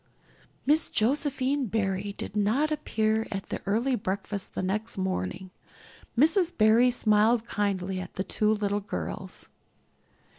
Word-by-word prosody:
Miss 300 +4 +3
Josephine 275 +2 +1
Barry 200 -1 -1
did - - -6
not 230 +10 +2
appear 220 -7 0
at 195 -1 -5
the - - -4
early 235 +6 +1
breakfast 200 -1 -4
the - - -2
next 210 +4 -2
morning. 185 - -3 0.7
Mrs. 340 - +3
Barry 225 +3 +5
smiled 225 -1 +3
kindly 190 -2 -1
at 180 -1 -8
the 190 - -1
two 215 +2 +1
little 205 -1 0
girls. 90 - -6
215 Hz, 125 wpm, -28 LUFS, 195-250 Hz, 0.7 s, Barry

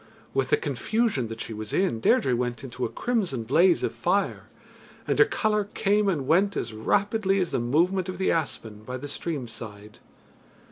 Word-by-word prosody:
With - - 0
the 440 - +4
confusion 225 - 0
that 115 0 -7
she 115 - -5
was 110 0 -6
in, 185 -12 +1
Deirdre 125 +2 +3
went 120 0 -2
into 125 -1 -4
a - - -2
crimson 195 - -1
blaze 170 +10 +4
of - - -1
fire, 195 +3 0 0.6
and - - 0
her 430 - +8
colour 215 - 0
came 205 0 +2
and 150 -8 -1
went 190 +7 +3
as 115 - -3
rapidly 195 - +1
as 180 -2 -1
the - - 0
movement 170 +10 +1
of 185 - -5
the 190 - +1
aspen 115 -9 -3
by 125 +3 -5
the 145 +3 -7
stream 145 -2 -4
side. 105 -2 -11
155 Hz, 185 wpm, -26 LUFS, 120-195 Hz, 0.6 s, her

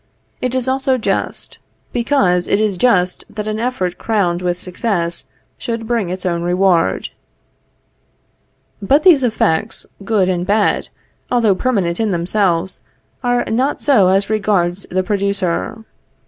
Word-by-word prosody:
It 250 0 -1
is 255 -1 +1
also 265 0 +1
just; 230 - -3 0.3
because 235 -8 +1
it 200 - +2
is 215 -3 +1
just 180 -4 +1
that 210 0 -6
an 215 0 -2
effort 225 -7 -2
crowned 185 -6 0
with 175 -1 -1
success 180 -2 -2 0.3
should 230 -1 -4
bring 225 -5 -1
its 185 +1 -5
own 170 -2 0
reward. 175 - +1 1.7
But 275 +10 +3
these 335 -7 +6
effects, 215 -4 0 0.2
good 195 -2 +1
and 180 -2 0
bad, 205 +3 +1 0.4
although 230 -5 +3
permanent 185 -6 -1
in 220 -1 +1
themselves, 180 0 0 0.4
are 245 0 +1
not 255 +6 0
so 235 -10 +5
as 195 +2 +2
regards 195 -4 0
the 185 +1 0
producer. 200 +2 -2
200 Hz, 135 wpm, -17 LUFS, 180-230 Hz, 1.7 s, these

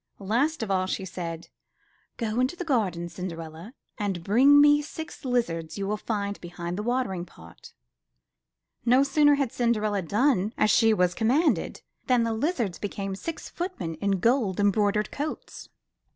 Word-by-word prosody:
Last 235 +9 0
of 205 - -3
all, 185 -1 +1
she 190 - -3
said: 170 -2 -6 0.7
*'Go 225 0 -2
into 255 +6 +1
the 360 - -5
garden, 195 - 0
Cinderella, 170 - -8 0.2
and 195 -5 -2
bring 265 +10 +6
me 295 0 +7
the - - -2
six 320 0 -8
lizards 210 - -1
you 200 - -2
will 210 - 0
find 205 -2 -3
behind 175 0 -6
the 205 - -3
watering 235 -6 -1
pot." 85 - -15 1.1
No 250 +3 +5
sooner 290 +1 +4
had 275 -4 -1
Cinderella 215 -4 +1
done 215 - +1
as 215 - +3
she 225 +1 +5
was 180 -4 +2
com 220 +4 -1
manded, 305 +7 +1 0.2
than 250 -2 +3
the 230 -1 0
lizards 230 - -1
became 195 -1 -4
six 330 +11 -6
footmen 345 - -4
in 195 +4 0
gold 225 -2 +1
embroidered 205 +1 +2
coats. 300 +2 -6
210 Hz, 160 wpm, -26 LUFS, 185-255 Hz, 1.1 s, me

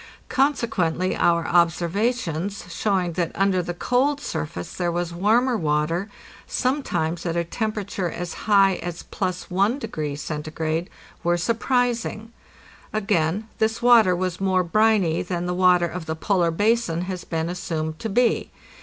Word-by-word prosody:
Consequently 195 - +1
our 170 -1 +2
observations 175 +2 0
showing 185 -5 0
that 170 -1 -1
under 195 -1 +2
the 175 0 -5
cold 265 +8 +1
surface 85 - -5
there 175 -1 -1
was 175 0 -2
warmer 230 +8 +2
water, 165 +2 0 0.4
sometimes 175 - -1
at 170 -1 -2
a 170 - +1
tem 215 +6 -2
perature 200 -4 -3
as 175 0 -5 0.2
high 195 -2 +5
as 175 -1 -6
+1° 185 - -2
C., 155 +2 -3 0.3
were 175 0 +2
surprising. 230 +1 -1 0.6
Again, 205 -1 0
this 220 +1 0
water 230 -7 +6
was 185 0 -3
more 185 -1 +2
briny 205 -3 +2
than 175 -1 -3
the 180 - -1
water 180 -1 +4
of 175 -1 -6
the 160 - -2
polar 175 0 +1
basin 205 -1 +1
has 180 -1 -4
been 160 0 -2
assumed 160 -3 -3
to 225 - -3
be. 240 +3 +2
180 Hz, 135 wpm, -23 LUFS, 170-215 Hz, 0.6 s, water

